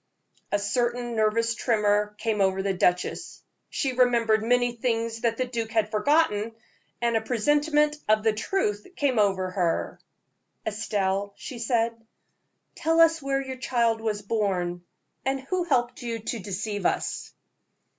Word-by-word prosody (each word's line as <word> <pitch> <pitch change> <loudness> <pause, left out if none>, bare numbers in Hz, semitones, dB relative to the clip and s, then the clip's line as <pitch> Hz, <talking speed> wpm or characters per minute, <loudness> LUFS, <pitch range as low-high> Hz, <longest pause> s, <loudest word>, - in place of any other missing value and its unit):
A 205 - +3
certain 240 +3 -1
nervous 225 +1 +2
tremor 210 -3 +1
came 215 -1 -1
over 190 0 +2
the 195 -1 0
duchess. 180 -1 -1 0.3
She 275 -6 -1
remembered 235 -3 +3
many 245 +1 +2
things 230 -1 -1
that 230 -1 +1
the 255 - 0
duke 235 -3 -3
had 220 -2 0
forgotten, 225 -3 +2 0.5
and 235 -1 +2
a 225 - +2
presentiment 295 +6 +2
of 215 0 +4
the 220 -1 +3
truth 210 - -1
came 265 -5 +1
over 190 -3 +2
her. 175 -3 -1 0.7
"Estelle," 200 -2 -1
she 250 - -8
said, 230 0 +1 0.8
"tell 325 +1 +1
us 330 -1 +5
where 275 0 0
your 260 -1 -6
child 235 -3 +1
was 210 -2 -2
born, 185 -5 -1 0.4
and 270 +1 0
who 355 +7 -2
helped 250 -6 0
you 235 -1 -3
to 225 +1 -4
deceive 200 0 -2
us?" - - -2
225 Hz, 145 wpm, -26 LUFS, 210-250 Hz, 0.8 s, us